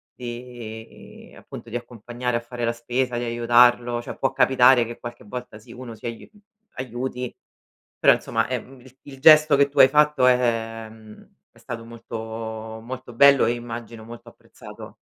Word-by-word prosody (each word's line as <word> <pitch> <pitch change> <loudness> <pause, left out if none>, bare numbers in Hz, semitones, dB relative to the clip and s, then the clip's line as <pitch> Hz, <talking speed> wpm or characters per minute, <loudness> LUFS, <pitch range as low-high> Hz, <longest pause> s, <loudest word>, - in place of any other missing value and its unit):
di 120 -2 -10
appunto 115 - -11
di 115 - -7
accompagnare 120 +1 -4
a - - -2
fare 120 0 -5
la 115 - 0
spesa, 120 +1 -2
di 120 - -3
aiutarlo. 120 0 +3
Cioè, - - -9
può 135 - 0
capitare 130 -2 +5
che 115 +1 -8
qualche 120 0 -9
volta, 120 0 -8
sì, 110 - -16
uno 125 -2 -9
si 110 - -14
aiu 115 -1 -8 0.5
aiuti, 125 0 -5 0.7
però - - +6
insomma, - - -1
è, - - -3
mhmm, 130 0 -16
il 130 +1 -18
il 135 -2 -12
gesto 155 0 +7
che 140 0 +3
tu 140 0 -1
hai 130 - +9
fatto 150 -2 +3
è 115 -3 0
mhmm, 110 -1 -16 0.2
è - - -24
stato 115 -1 -8
molto 115 0 -9 0.6
molto 125 +2 -9
bello 140 +3 +6
e - - +1
immagino 115 -1 -8
molto 115 +1 -12
apprezzato. - - -14
120 Hz, 170 wpm, -23 LUFS, 115-130 Hz, 0.7 s, hai